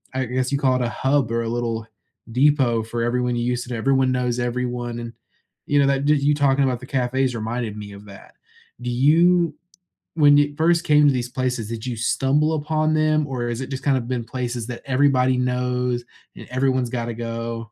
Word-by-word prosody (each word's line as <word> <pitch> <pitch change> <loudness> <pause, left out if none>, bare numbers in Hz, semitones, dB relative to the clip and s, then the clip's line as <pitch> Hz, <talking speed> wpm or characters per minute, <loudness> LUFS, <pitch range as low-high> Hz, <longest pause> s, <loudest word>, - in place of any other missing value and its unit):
I 130 - 0
guess 125 +2 -2
you 140 - 0
call 130 -2 +2
it 125 - 0
a 120 - -1
hub 135 -1 0
or 115 - 0
a 115 - -3
little 115 -2 -3 0.4
depot 130 -3 +3
for 115 +1 -3
everyone 125 +1 0
you 120 - -1
used 125 0 -2
to 125 - -4
everyone 130 +2 +2
knows 125 -1 -1
everyone, 120 -1 -3
and, 120 0 -6 0.5
you 145 -1 +2
know, 140 - +4
that 140 0 +1
did 150 -1 +3
you 145 +1 +3
talking 140 -1 +2
about 130 -3 0
the 125 - -10
cafes 130 -1 0
reminded 115 0 -3
me 105 -1 -8
of 100 +1 -12
that. 100 -1 -14 0.5
Do 125 - -3
you 165 +5 +3 0.6
when 145 -2 +6
you 145 0 +2
first 170 +1 +3
came 150 -2 +4
to 140 - +4
these 125 -1 -2
places, 125 -4 -2
did 115 0 -5
you 125 -2 -3
stumble 140 +7 +1
upon 155 0 0
them, 155 -1 +2
or 125 -3 -3
is 120 +2 -3
it 130 - -6
just 130 0 -5
kind 140 -2 +2
of 120 -2 -4
been 125 -2 -2
places 120 -1 -4
that 120 -1 -6
everybody 130 -1 +2
knows, 125 -1 -1 0.3
and - - -11
everyone's 130 -1 0
gotta 120 -1 -3
go? 115 0 -4
125 Hz, 210 wpm, -22 LUFS, 120-140 Hz, 0.6 s, when